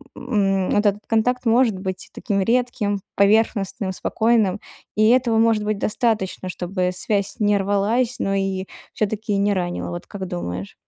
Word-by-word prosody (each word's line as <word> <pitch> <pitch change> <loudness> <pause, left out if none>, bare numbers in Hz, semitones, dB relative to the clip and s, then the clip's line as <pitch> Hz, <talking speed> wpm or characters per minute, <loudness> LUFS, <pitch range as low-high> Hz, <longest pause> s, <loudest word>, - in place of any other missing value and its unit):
м, 195 -4 0
вот 205 +1 +2
этот 205 0 +2
контакт 245 +3 +1
может 225 -4 +3
быть 190 -1 -5
таким 200 -4 -1
редким, 230 -2 0 0.2
поверхностным, 200 -2 +2
спокойным, 220 -2 +1 0.4
и 215 +1 +4
этого 240 -3 +3
может 225 -2 +3
быть 210 -1 -1
достаточно, 210 -5 -1
чтобы 180 0 -2
связь 200 +3 -1
не 205 -1 +3
рвалась, 210 +5 0
но 195 0 0
и 195 -1 -1 0.3
всё-таки 215 0 -1
не 200 +1 +2
ранило, 175 -2 -2
вот 175 0 -6
как 190 -2 -6
думаешь? 95 - -5
205 Hz, 150 wpm, -22 LUFS, 190-225 Hz, 0.4 s, и